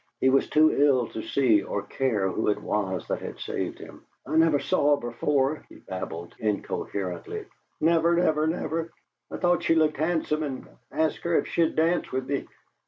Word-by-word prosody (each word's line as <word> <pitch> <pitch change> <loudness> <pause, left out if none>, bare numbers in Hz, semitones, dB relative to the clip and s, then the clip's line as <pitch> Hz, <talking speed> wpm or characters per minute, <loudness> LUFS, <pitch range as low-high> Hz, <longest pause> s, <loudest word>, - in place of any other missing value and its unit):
He 130 - +4
was 135 - +2
too 155 +1 +5
ill 135 -4 +3
to 110 - -5
see, 115 -7 +3
or 100 - -3
care, 115 -8 0
who 95 - -1
it 105 - +2
was 95 -3 -2
that - - -2
had - - -7
saved - - -4
him. - - -12 0.2
"I - - -3
never 160 -2 +5
saw 145 +1 +2
her 120 - -5
before," 140 +4 0
he - - -14
babbled, 85 -2 -7
incoherently, 100 -4 -3 0.3
"never, 170 +1 +3
never, 155 -3 +2
never! 165 0 -2 0.4
I - - -5
thought 175 -1 +2
she 165 - +2
looked 155 -1 +2
handsome, 155 0 0
and 140 -4 -4 0.2
asked 160 0 0
her 170 -1 +1
if - - +1
she'd 165 -1 +1
dance 165 +2 +1
with 130 0 -2
me. 140 -1 -2
145 Hz, 180 wpm, -26 LUFS, 115-160 Hz, 0.4 s, too